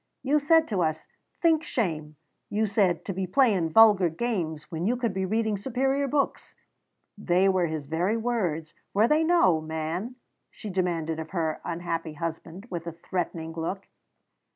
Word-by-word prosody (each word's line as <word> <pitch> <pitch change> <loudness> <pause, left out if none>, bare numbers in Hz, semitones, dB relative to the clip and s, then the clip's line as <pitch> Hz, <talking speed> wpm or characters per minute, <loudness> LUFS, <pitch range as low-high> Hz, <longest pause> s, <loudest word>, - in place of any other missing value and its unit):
You 290 +3 +3
said 320 +2 +4
to 195 -5 0
us, 155 -1 -1 0.4
'Think 325 -2 +4
shame,' 155 - -2 0.3
you 215 +2 +1
said, 200 -4 +1
'to 195 - -3
be 190 0 -3
playing 195 -6 +3
vulgar 205 -1 +6
games 165 -5 -2
when 165 +3 -2
you 245 - +2
could 235 -4 -1
be 190 0 -1
reading 220 0 0
superior 270 +4 0
books.' 280 +1 -1 0.6
They 185 -1 +3
were 185 -3 +2
his 155 -2 -4
very 175 +9 0
words, 185 -10 -2 0.2
were 215 +3 +5
they 305 +4 +3
no, 315 - +4
man?" 160 +9 -4 0.3
she 210 - -8
demanded 170 -4 -1
of 160 0 -6
her 160 -4 -2
unhappy 165 -2 -3
husband, 165 +4 -6
with 170 -1 -5
a - - -2
threatening 165 -1 -4
look. 170 +4 -4
185 Hz, 160 wpm, -27 LUFS, 165-225 Hz, 0.6 s, vulgar